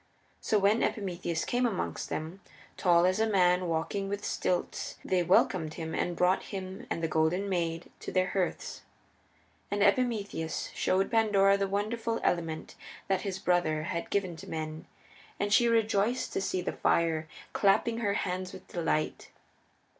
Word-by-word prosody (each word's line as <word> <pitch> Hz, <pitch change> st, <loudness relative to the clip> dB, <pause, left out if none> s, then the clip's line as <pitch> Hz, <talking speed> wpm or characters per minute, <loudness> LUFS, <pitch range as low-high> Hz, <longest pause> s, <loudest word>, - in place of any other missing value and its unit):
So 215 Hz, -, +1 dB
when 205 Hz, +3 st, +3 dB
Epimetheus 175 Hz, -5 st, -1 dB
came 245 Hz, 0 st, +1 dB
amongst 200 Hz, -6 st, -3 dB
them, 160 Hz, +5 st, -5 dB, 0.3 s
tall 175 Hz, -1 st, +4 dB
as 185 Hz, +3 st, +2 dB
a 220 Hz, -, +3 dB
man 180 Hz, -2 st, +3 dB
walking 170 Hz, +5 st, -1 dB
with 205 Hz, +1 st, -3 dB
stilts, 180 Hz, -1 st, -2 dB
they 185 Hz, -1 st, +2 dB
welcomed 170 Hz, -2 st, +2 dB
him 160 Hz, -1 st, -5 dB
and 175 Hz, -, -1 dB
brought 180 Hz, +2 st, +3 dB
him 190 Hz, -1 st, -6 dB
and 165 Hz, -, -2 dB
the -, -, +2 dB
Golden 160 Hz, +5 st, +1 dB
Maid 170 Hz, -3 st, -2 dB
to -, -, -6 dB
their 185 Hz, 0 st, +2 dB
hearths. 185 Hz, -3 st, -2 dB, 0.9 s
And 205 Hz, 0 st, +1 dB
Epimetheus 200 Hz, -, 0 dB
showed 190 Hz, +1 st, +1 dB
Pandora 205 Hz, -3 st, +4 dB
the 200 Hz, 0 st, 0 dB
wonderful 225 Hz, +3 st, -1 dB
element 165 Hz, -2 st, -1 dB, 0.4 s
that 190 Hz, -1 st, +2 dB
his 195 Hz, -2 st, -3 dB
brother 175 Hz, -4 st, +1 dB
had 170 Hz, 0 st, -3 dB
given 185 Hz, -4 st, -1 dB
to 195 Hz, +4 st, -10 dB
men, 155 Hz, 0 st, -5 dB, 0.5 s
and 205 Hz, 0 st, +1 dB
she 240 Hz, +1 st, +5 dB
rejoiced 225 Hz, +1 st, +1 dB
to -, -, 0 dB
see 185 Hz, -1 st, -1 dB
the -, -, -2 dB
fire, 160 Hz, -2 st, +1 dB, 0.3 s
clapping 225 Hz, +3 st, +3 dB
her 205 Hz, -4 st, +1 dB
hands 185 Hz, -1 st, -2 dB
with 190 Hz, -, -11 dB
delight. 160 Hz, -3 st, -1 dB
185 Hz, 155 wpm, -30 LUFS, 170-200 Hz, 0.9 s, she